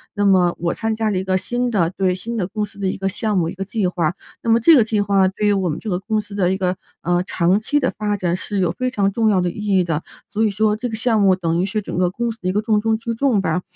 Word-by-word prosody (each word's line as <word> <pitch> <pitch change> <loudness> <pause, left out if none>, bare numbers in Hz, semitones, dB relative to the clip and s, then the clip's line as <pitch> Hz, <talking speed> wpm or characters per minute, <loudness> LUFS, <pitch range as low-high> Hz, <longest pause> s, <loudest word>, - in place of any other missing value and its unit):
那 205 -1 +1
么 185 -3 +4
我 170 0 0
参 225 0 -2
加 220 0 0
了 200 - 0
一 185 - -1
个 190 0 +1
新 245 +5 -1
的 175 -7 +2
对， 185 0 0
新 225 +6 -5
的 195 - 0
公 210 +2 -2
司 205 0 -12
的 195 - -1
一 185 - -2
个 195 0 -2
项 210 +1 -1
目、 165 -2 +1
一 - - -6
个 195 - -4
计 205 +1 -1
划。 175 -2 0 0.3
那 230 - -3
么 225 +1 +5
这 325 +7 +7
个 240 - +6
计 215 -2 0
划 195 -2 +3
对 195 +3 -2
于 205 - +4
我 190 -2 0
们 150 - -2
这 220 - -6
个 180 -2 -1
公 215 +2 -1
司 205 -1 -13
的 185 -3 +2
一 - - -1
个， 185 -1 -1 0.2
呃， 175 +1 +1
长 185 +1 +1
期 290 +7 0
的 260 - +1
发 210 -1 -1
展 175 -3 -1
是 205 +1 -4
有 180 -3 +1
非 255 +6 -2
常 200 -5 0
重 220 +2 +2
要 190 -3 +3
的 175 -1 0
意 205 0 0
义 185 - +4
的， 165 -3 -2 0.3
所 220 - 0
以 - - +2
说 210 +1 +1
这 245 - -3
个 225 - -4
项 225 0 +1
目 190 -2 +5
等 170 -2 -1
于 - - +1
是 210 +2 -2
整 195 - -6
个 180 -1 +2
公 235 +5 -2
司 225 - -11
的 180 - -3
一 185 - +1
个 210 - +1
重 215 -1 +2
中 220 +1 +1
之 230 +1 -4
重 230 -3 +1
吧。 180 -1 0
200 Hz, 345 characters per minute, -20 LUFS, 185-220 Hz, 0.3 s, 这